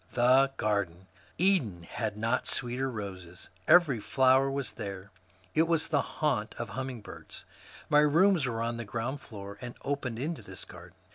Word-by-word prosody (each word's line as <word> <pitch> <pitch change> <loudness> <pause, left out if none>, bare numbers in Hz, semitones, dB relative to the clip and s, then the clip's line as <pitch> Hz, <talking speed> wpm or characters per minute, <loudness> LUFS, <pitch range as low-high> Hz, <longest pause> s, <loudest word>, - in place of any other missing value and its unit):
The 130 +3 +5
garden! 95 -4 -1 0.3
Eden 160 - +2
had 105 +4 -4
not 115 +4 0
sweeter 125 +2 0
roses; 95 -6 -8 0.2
every 155 -9 +6
flower 130 +3 +4
was 135 -1 -3
there; 100 -2 -7 0.4
it 160 +1 +3
was 165 -2 +1
the 145 -3 +3
haunt 140 -9 -1
of 115 -2 -5
hummingbirds. 125 -1 -7 0.4
My 150 - +5
rooms 160 +1 +4
were 115 -2 -2
on 115 0 -2
the 115 - -4
ground 120 +6 -4
floor 100 -1 -9
and 120 -1 -7
opened 140 -5 -2
into 150 +6 -3
this 95 0 -8
garden. 85 +1 -13
120 Hz, 155 wpm, -30 LUFS, 105-140 Hz, 0.4 s, every